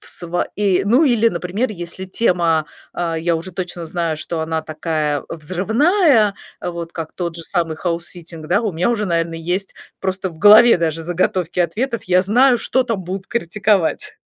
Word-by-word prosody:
в - - -14
сво 175 0 -2
и, 200 -3 +2
ну, 250 +10 +4
или, 230 -4 +4
например, 190 +6 -2
если 175 0 -6
тема, 170 -6 +1 0.3
а, 165 -2 -2
я 170 0 0
уже 175 +3 -6
точно 175 -1 -5
знаю, 165 -1 -2
что 160 +1 -4
она 160 0 -2
такая 155 -2 -2
взрывная, 220 - +2 0.3
вот 170 -1 -5
как 160 -2 -6
тот 170 -2 -4
же 165 - -7
самый 165 -2 -2
хаусситтинг 170 -1 -4
да, 205 - +2
у 210 -5 -1
меня 175 +8 +1
уже, 210 -3 -1
наверное, 165 -1 -1
есть 180 +4 -3 0.3
просто 190 -1 -2
в 160 - -15
голове 210 +3 +8
даже 165 -1 -1
заготовки 175 +1 -1
ответов. 230 +8 -1
Я 185 0 +3
знаю, 245 +5 +4
что 260 +3 +1
там 225 -6 -2
будут 190 +2 -5
критиковать. 200 -3 0
180 Hz, 170 wpm, -19 LUFS, 165-210 Hz, 0.3 s, голове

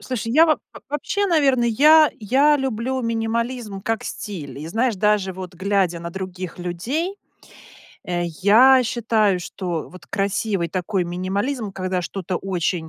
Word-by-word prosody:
Слушай, 230 -2 -4
я 320 +4 +6
во 310 - +3
в - - -16
вообще, 350 +8 -1
наверно, 280 -8 +3
я 300 +7 +6
я 275 +7 +3
люблю 260 -1 -2
минимализм 230 -1 -2
как 225 +1 -1
стиль, 150 -11 -6
и 155 - -7
знаешь, 225 +3 0
даже 210 -1 +1
вот 185 0 -8
глядя 190 -2 0
на 170 0 -6
других 185 -1 -6
людей, 240 - -3 0.9
э, 175 -1 -2 0.2
я 255 +6 +7
считаю, 220 -5 +1
что 175 -2 -4
вот 185 - -14
красивый 195 -2 -1
такой 185 +2 -1
минимализм, 200 +7 -2
когда 185 -1 -2
что-то 185 0 -4
очень 180 -3 -2
205 Hz, 145 wpm, -22 LUFS, 185-250 Hz, 0.9 s, я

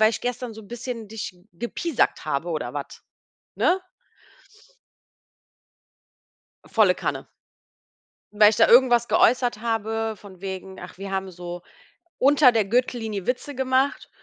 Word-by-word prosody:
weil 215 0 +6
ich - - -4
gestern 245 -1 -4
so 220 - -10
'n 200 - -17
bisschen 240 -2 -6
dich 220 0 -5
g 180 -1 -24
gepiesackt 240 - -1
habe 150 +3 -2
oder 135 -7 -3
was, 145 -1 -7 0.5
ne?“ 365 +2 +2 2.8
Volle - - +3
Kanne. - - -4 1.1
Weil 210 0 +7
ich 215 - -2
da 225 - +6
irgendwas 240 -1 +5
geäußert 245 -2 +3
habe, 225 -1 -2
von 190 -2 -14
wegen 190 -1 -6
ach, - - -10
wir 195 0 -7
haben 190 -1 -3
so 175 0 -8 0.6
unter 280 -1 +6
der 225 -3 +1
Gürtellinie 225 -3 -1
Witze 260 +3 -2
gemacht 265 +1 0
225 Hz, 135 wpm, -24 LUFS, 190-245 Hz, 2.8 s, Weil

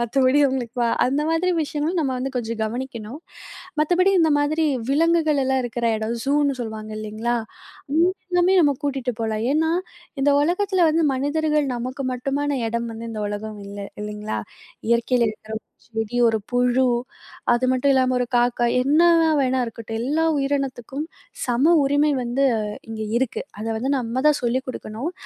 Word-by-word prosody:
மத்தபடி 255 +3 +3
அவங்களுக்கு 250 -2 -3 0.3
அந்த 275 +4 0
மாதிரி 335 +3 +1
விஷயங்களும் 305 +4 -2
நம்ப 270 -4 0
வந்து 265 +1 -3
கொஞ்சம் 230 -2 -3
கவனிக்கணும். 235 +1 -5 0.6
மத்தபடி 360 +5 +3
இந்த 320 -1 +4
மாதிரி 310 +2 +1 0.3
விலங்குகள் 315 0 +3
எல்லாம் 265 0 +1
இருக்குற 240 0 -2
இடம் 220 +2 -2
சூன்னு 285 0 +2
சொல்லுவாங்க 220 -1 -6
இல்லங்களா? 215 +3 -2 0.5
அங்கயுமே 355 +3 +2
நம்ப 290 -3 +4
கூட்டிகிட்டு 265 -3 -1
போலாம். 220 -1 -1
ஏன்னா, 320 +2 +2 0.5
இந்த 285 +1 +4
உலகத்துல 365 +2 +2
வந்து 325 +2 +2
மனிதர்கள் 300 +2 +1
நமக்கு 255 +3 -4
மட்டுமான 280 +3 -1 0.2
எடம் 235 +1 -2
வந்து 230 +1 -7
இந்த 215 -1 -4
உலகம் 210 0 -5
இல்ல, 200 0 -8 0.2
இல்லங்களா 210 0 -4 0.5
இயற்கையில 235 +1 +3
இருக்குற 220 0 -7 0.3
செடி, 225 0 -4
ஒரு 225 -1 +1
புழு 250 +1 +2 0.7
அது 240 +1 +1
மட்டும் 260 +2 +3
இல்லாமல 255 -1 +2
ஒரு 245 - 0
காக்கா 240 0 +2 0.2
என்ன 295 +5 +3 0.4
வேணா 260 -1 +1
இருக்கட்டும். 225 0 -6
எல்லா 300 +6 +1
உயிரினத்துக்கும் 275 0 -2 0.4
சம 265 +8 +3
உரிமை 290 +2 +3
வந்து 245 +3 0 0.5
இங்க 220 -1 -4 0.2
இருக்கு. 260 -2 -1 0.2
அத 220 - -4
வந்து 260 +4 -1
நம்ப 235 0 -3
தான் 300 - +2
சொல்லிக் 250 +2 0
கொடுக்கணும். 250 +5 -5
260 Hz, 145 wpm, -23 LUFS, 235-290 Hz, 0.7 s, இந்த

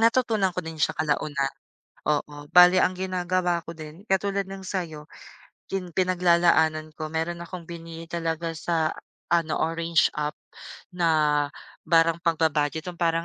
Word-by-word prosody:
natutunan 225 -5 +2
ko 180 - -2
din 160 -1 -8
sya - - +1
kalaunan. 145 -3 -1 0.5
Oo, 145 -1 -1
bale 180 +1 +8
ang 185 - 0
ginagawa 180 -2 -1
ko 165 - -7
din 155 +5 -11
katulad 195 0 0
ng 195 0 -8
sa'yo, 165 -5 -5 0.6
yung 185 -2 -3
pinaglalaanan 170 -4 +3
ko, 155 0 -5
meron 165 +2 -3
akong 170 0 -7
binili 165 0 -8
talaga 165 0 -3
sa 160 0 0 0.4
ano, 165 -2 +2
orange 165 -1 +1
app 150 0 -3 0.6
na 155 -4 +2 0.4
parang 165 0 +4
pagba-budget, 160 -2 +1
yung 175 0 -15
parang 165 0 +1
165 Hz, 135 wpm, -25 LUFS, 155-180 Hz, 0.6 s, bale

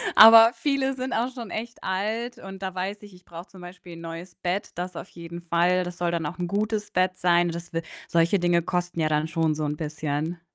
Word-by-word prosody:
Aber 225 +1 +10
viele 275 -2 0
sind 255 0 -4
auch 245 +3 -1
schon 235 -6 -7
echt 230 +4 -6
alt 215 +6 -2
und 195 0 -10
da 190 -1 -4
weiß 195 +3 -3
ich, 205 -2 -13
ich 180 - -20
brauche 170 +2 -10
zum 185 -2 -15
Beispiel 175 -1 -11
'n 165 - -11
neues 165 +2 -8
Bett, 185 +3 -2
das 180 +1 -5
auf - - -7
jeden 170 0 -9
Fall. 175 +2 +2
Das 175 -1 -7
soll 175 -1 0
dann 165 -2 -2
auch 170 - -7
'n 175 -1 -2
gutes 210 +2 -2
Bett 185 0 +1
sein. 175 -1 +3
Das 170 0 -7
w 165 - -1 0.3
solche 170 +3 +3
Dinge 175 -1 +3
kosten 175 0 -2
ja 155 -1 +2
dann 150 +1 +1
schon 160 -1 0
so 155 0 -2
'n 150 0 -2
bisschen. 155 +2 -3
180 Hz, 235 wpm, -25 LUFS, 170-200 Hz, 0.3 s, Aber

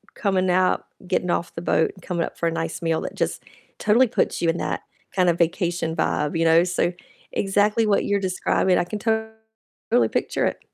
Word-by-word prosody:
Coming 190 -3 +1
out, 185 +1 +2 0.2
getting 180 -1 0
off 170 0 -1
the 165 - -4
boat, 160 -1 +2
and 185 - -17
coming 170 -2 -2
up - - -10
for 170 - +1
a - - +1
nice 165 0 -3
meal, 165 -1 0
that - - -5
just - - -2 0.3
totally 230 +5 +4
puts 235 - 0
you 170 - +2
in 165 - 0
that - - -2 0.3
kind 180 -2 +3
of 170 - +1
vacation 170 -1 0
vibe, 150 0 0
you 165 - +2
know? 165 +1 +6
So 175 0 0 0.4
exactly 205 +3 +2
what 205 -2 +2
you're 205 0 +1
describing, 185 0 +1
I - - +2
can 210 +4 -5
totally 220 +1 -2
picture - - -1
it. - - -1
180 Hz, 200 wpm, -23 LUFS, 170-210 Hz, 0.4 s, know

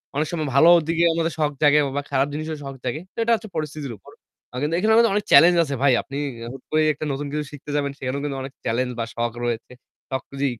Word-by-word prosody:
অনেক 150 +2 0
সময় 160 -3 -2
ভালো 160 +5 +7 0.2
দিকে 165 0 +1
আমাদের 165 0 0
শখ 150 -1 +2
জাগে 150 0 +5 0.2
বা - - +1
খারাপ 135 0 +2
জিনিসেরও 155 0 -4
শখ 135 - -6
জাগে। 130 +5 -3
তো - - -44
এটা 235 - +1
হচ্ছে 220 -1 -8
পরিস্থিতির 150 -4 -4
উপর। - - -16 0.5
কিন্তু, 150 +3 0
এখানে 215 +4 +2
আমাদের 230 0 +5
অনেক 205 0 0
চ্যালেঞ্জ 170 +5 +8
আছে 140 -3 -3
ভাই! 140 -2 +5
আপনি 140 - -7 0.4
হুট 135 - -11
করে 155 - +3
একটা 150 +2 -6
নতুন 140 +1 -3
কিছু 150 +1 -2
শিখতে 145 0 -9
যাবেন, 140 -1 0
সেখানেও 135 +2 -3
কিন্তু 140 -2 -3
অনেক 135 0 -7
চ্যালেঞ্জ 125 +2 0
বা 115 - -1
শখ 120 0 -1
রয়েছে। 120 -1 -3 0.4
সবকিছুই 135 0 -2
145 Hz, 225 wpm, -23 LUFS, 135-155 Hz, 0.5 s, চ্যালেঞ্জ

